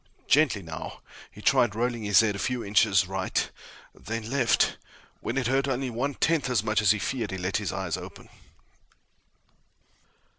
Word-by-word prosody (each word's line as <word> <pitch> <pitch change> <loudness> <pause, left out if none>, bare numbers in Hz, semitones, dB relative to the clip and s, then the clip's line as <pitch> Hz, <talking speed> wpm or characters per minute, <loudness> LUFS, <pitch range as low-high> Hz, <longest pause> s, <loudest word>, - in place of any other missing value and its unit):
Gently, 135 -9 +3
now, 80 0 -8 0.3
he - - -14
tried 110 -4 +3
rolling 120 0 -1
his 105 0 +5
head 105 -2 0
a - - -5
few 125 +2 -2
inches 100 -2 +3
right, 95 0 -1 0.5
then 115 0 -6
left. 125 -5 +2 0.4
When - - -4
it 130 - 0
hurt 135 +3 +1
only 130 -1 -2
one 130 +4 -2
tenth 160 -4 +1
as 115 -5 +1
much 110 -1 +1
as 105 - +3
he 105 - +5
feared, 115 0 -3
he 95 - -4
let 95 +1 -1
his - - -3
eyes - - -3
open. - - -10
115 Hz, 170 wpm, -27 LUFS, 100-125 Hz, 0.5 s, his